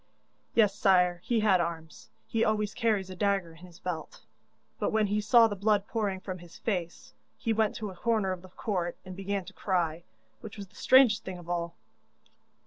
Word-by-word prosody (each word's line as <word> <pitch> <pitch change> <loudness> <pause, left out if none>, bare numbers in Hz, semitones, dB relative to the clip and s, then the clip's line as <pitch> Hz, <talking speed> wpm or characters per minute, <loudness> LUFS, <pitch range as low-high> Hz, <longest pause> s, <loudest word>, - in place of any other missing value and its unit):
'Yes, 210 -4 +5
sire, 180 -4 +3
he 235 -3 +1
had 195 -4 +4
arms; 165 -2 -6 0.2
he 225 0 0
always 210 -1 0
carries 205 -5 0
a - - -7
dagger 195 -3 0
in 165 - -16
his 170 -2 -16
belt. 175 -3 -5 0.6
But - - 0
when 220 -1 +2
he 205 +1 0
saw 230 +2 +6
the 205 - -4
blood 205 0 +2
pouring 205 -4 -1
from 185 -1 -6
his 170 -1 -13
face, 180 -6 -4 0.2
he 225 - -1
went 220 -1 +1
to 215 -4 -5
a - - -12
corner 215 -1 0
of 185 -1 -4
the 185 - -13
court 180 -2 -3
and 185 0 -8
began 195 0 -3
to - - -11
cry, 175 -4 -1 0.4
which - - -10
was 200 -2 -8
the - - -25
strangest 255 -5 +5
thing 190 -1 -6
of 175 -1 -12
all. 170 -1 -2
195 Hz, 200 wpm, -29 LUFS, 175-215 Hz, 0.6 s, saw